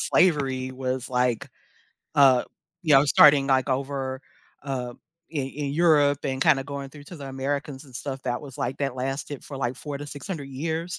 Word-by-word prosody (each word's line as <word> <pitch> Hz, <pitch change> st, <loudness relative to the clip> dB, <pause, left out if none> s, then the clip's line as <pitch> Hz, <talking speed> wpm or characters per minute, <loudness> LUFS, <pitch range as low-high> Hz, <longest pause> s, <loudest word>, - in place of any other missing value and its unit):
slavery 135 Hz, -7 st, +2 dB
was, 130 Hz, 0 st, -3 dB
like, 125 Hz, -2 st, 0 dB, 0.6 s
uh, 135 Hz, -3 st, +6 dB, 0.4 s
you 155 Hz, -3 st, +4 dB
know, 135 Hz, +1 st, +7 dB
starting, 145 Hz, -1 st, +6 dB
like, 130 Hz, -2 st, +2 dB
over, 135 Hz, 0 st, -2 dB, 0.4 s
uh, 125 Hz, -3 st, -4 dB, 0.3 s
in 145 Hz, -4 st, -2 dB
in 140 Hz, 0 st, -4 dB
Europe 145 Hz, -3 st, +3 dB
and 130 Hz, 0 st, 0 dB
kinda 140 Hz, -4 st, +4 dB
going 140 Hz, -1 st, -6 dB
through 145 Hz, 0 st, -12 dB
to 175 Hz, -, -10 dB
the 140 Hz, -3 st, -8 dB
Americans 140 Hz, +1 st, -3 dB
and 130 Hz, -3 st, -16 dB
stuff 135 Hz, +1 st, -4 dB
that 125 Hz, -1 st, -2 dB
was, 135 Hz, -3 st, -10 dB
like, 125 Hz, +2 st, -2 dB
that 135 Hz, -3 st, -1 dB
lasted 135 Hz, +2 st, -4 dB
for, 140 Hz, -, -7 dB
like, 125 Hz, -1 st, -2 dB
4 145 Hz, -2 st, -5 dB
to 145 Hz, -, -7 dB
600 145 Hz, 0 st, -6 dB
years. 160 Hz, +5 st, -3 dB
135 Hz, 180 wpm, -25 LUFS, 130-145 Hz, 0.6 s, know